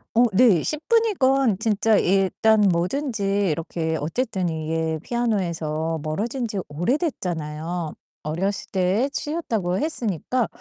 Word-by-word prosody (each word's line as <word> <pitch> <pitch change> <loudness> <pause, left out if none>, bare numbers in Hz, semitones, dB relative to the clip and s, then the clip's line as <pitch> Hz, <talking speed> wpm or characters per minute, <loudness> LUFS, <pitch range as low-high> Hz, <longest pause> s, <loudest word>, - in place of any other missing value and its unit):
어 240 - +6
네. 195 -5 +5
10 305 0 -3
분이건 275 - +3
진짜 220 0 +2
일단 195 +3 +3
뭐든지 205 - 0 0.3
이렇게 160 0 -2
어쨌든 185 - -1
이게 160 0 -2
피아노에서 170 -9 -1
멀어진지 215 - -2
오래됐잖아요. 170 - -2 0.3
어렸을 185 +6 -2
때 195 +8 +1
치셨다고 225 - -2
했으니까 245 - -1
195 Hz, 265 characters per minute, -23 LUFS, 165-240 Hz, 0.3 s, 어